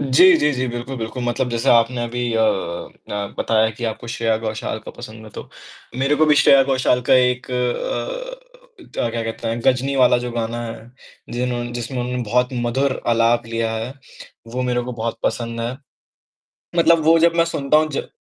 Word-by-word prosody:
जी, 155 +7 +6
जी, 150 -1 +2
जी, 130 -1 -1
बिल्कुल, 120 +2 -5
बिल्कुल। 115 +2 -5
मतलब 120 +1 -1
जैसे 115 -1 -1
आपने 120 +1 +3
अभी 120 0 -2
अ 110 - +2
अ, 100 0 -2
बताया 110 0 +2
कि 115 +2 -7
आपको 115 +1 -4
श्रेया 115 -1 0
घोषाल 110 0 -4
का - - -7
पसंद 110 -2 -10
है, 110 - -12
तो - - -9 0.5
मेरे 135 +2 +2
को 155 - +4
भी 150 - +5
श्रेया 140 -1 +6
घोषाल 130 -2 +1
का - - +7
एक 125 0 +2
अ 125 - -2
अ, - - -5
क्या - - -1
क्या 115 0 -3
कहते 115 0 -4
हैं, 115 +1 -2
गजनी 135 +1 +2
वाला 125 -1 +5
जो 125 0 -4
गाना 115 0 -3
है, 115 0 -9 0.4
जिन्होंने 120 0 -2
जिसमें 120 +2 -4
उन्होंने 125 0 -2
बहुत 125 +3 +1
मधुर 130 +2 -1
आलाप 115 0 +2
लिया 115 0 -2
है, 115 +4 -4 0.5
वो 125 +2 -3
मेरे 125 -1 0
को 125 +1 -5
बहुत 115 0 -4
पसंद 115 0 -2
है। 120 +3 -3 1.0
मतलब 165 -1 +4
वो 165 +2 +5
जब 170 +1 +4
मैं 170 0 +4
सुनता 145 -2 +1
हूँ 155 0 +2
ज 140 - -3
125 Hz, 195 wpm, -20 LUFS, 115-135 Hz, 1.0 s, का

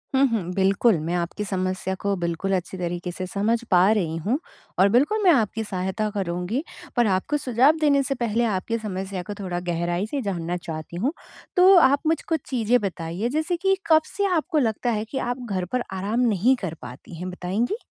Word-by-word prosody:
हुँ, 270 +1 +5
हुँ, 225 -5 0
बिल्कुल 195 +2 +3
मैं 165 +3 -3
आपकी 175 +4 -2
समस्या 185 -1 -2
को 200 0 0
बिल्कुल 175 +3 -2
अच्छे 185 +1 -4
तरीके 175 0 -3
से 185 +1 -5
समझ 210 +5 +1
पा 185 +3 +6
रही 175 -7 0
हूँ, 215 - -1 0.4
और 195 +2 +6
बिल्कुल 290 - +2
मैं 365 - +7
आपकी 220 -5 +1
सहायता 190 +2 -2
करूँगी, 190 - -2 0.3
पर 240 -3 +3
आपको 195 +10 +1
सुझाव 265 +3 +3
देने 285 -2 +4
से 275 +1 -1
पहले 235 -1 0
आपकी 225 +1 -1
समस्या 195 -3 -4
को 205 - -6
थोड़ा 180 -3 -3
गहराई 175 +2 -1
से 285 - -1
जानना 175 -5 -2
चाहती 165 -1 -7
हूँ। 250 - 0 0.4
तो 370 +2 +7
आप 280 -3 +5
मुझ 325 +1 +2
कुछ 325 -1 +1
चीज़ें 245 -1 +2
बताइए 185 +2 -3
जैसे 315 +6 0
कि 385 +2 +2
कब 315 -1 +6
से 405 - +1
आपको 320 +1 0
लगता 240 -1 0
है 215 0 -1
कि 270 - -3
आप 245 0 -3
घर 185 -2 -1
पर 250 - +1
आराम 200 +5 -1
नहीं 240 +1 +3
कर 180 -5 -3
पाती 125 +7 -10
हैं 180 +2 -5
बताएँगी? 195 - -2
205 Hz, 200 wpm, -24 LUFS, 180-250 Hz, 0.4 s, मैं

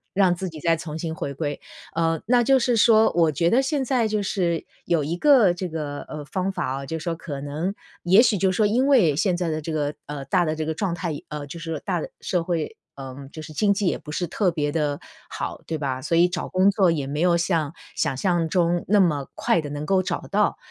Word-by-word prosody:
让 190 -2 +4
自 180 +1 -4
己 160 - -10
再 165 +2 +2
从 160 -2 -6
新 160 0 -4
回 160 -4 -4
归。 145 -1 -3 0.3
呃， 165 -1 +1
那 240 +1 +4
就 270 +2 +5
是 245 -1 +1
说 220 0 +5
我 165 -2 +4
觉 170 +4 +1
得 255 +3 +4
现 270 -1 -1
在 245 -3 +1
就 215 -1 -1
是 175 -4 -1 0.2
有 165 -3 +1
一 155 +4 -2
个 240 -5 +5
这 180 +1 -4
个， 150 -3 -4
呃， 150 -1 -6
方 185 +5 -2
法 - - -3 0.2
啊， - - -7
就 160 - -3
是 160 - -8
说 170 - -1
可 150 -4 -6
能 155 +7 -3 0.3
也 185 +4 +5
许 215 -5 +2
就 190 0 +3
是 185 - -3
说 215 - +4
因 245 +6 +2
为 210 - +4
现 175 +2 +1
在 175 - -1
的 155 0 -2
这 160 - -5
个， 150 -1 -1
呃， 145 -2 -6
大 175 +6 +2
的 155 -1 -1
这 155 - -3
个 160 - -1
状 180 0 -2
态 170 -1 -3 0.2
呃， 150 -1 -5
就 145 +4 -8
是 165 -2 -4
大 180 -4 -1
的 - - -5
社 180 -3 -1
会， 165 -3 -2 0.2
呃， 135 -2 -8 0.2
就 155 - -8
是 155 0 -10
经 200 +5 +3
济 200 -2 -1
也 - - +1
不 150 - -10
是 175 +3 -2
特 185 +2 +1
别 145 -3 -1
地 150 -3 -1 0.3
好， - - -5
对 160 - -2
吧？ 135 -3 -3
所 165 +4 0
以 175 - +6
找 - - -3
工 185 +1 +4
作 190 -4 +3
也 145 -4 -2
没 145 +3 -3
有 175 -1 +4
像 165 -3 0 0.2
想 150 -4 0
象 170 -1 +1
中 175 0 +1
那 205 0 +5
么 150 -7 +2
快 170 - +1
地 145 - -6
能 145 +1 -5
够 190 +1 +2
找 - - -2
到， 205 +1 +2
170 Hz, 270 characters per minute, -24 LUFS, 155-195 Hz, 0.3 s, 以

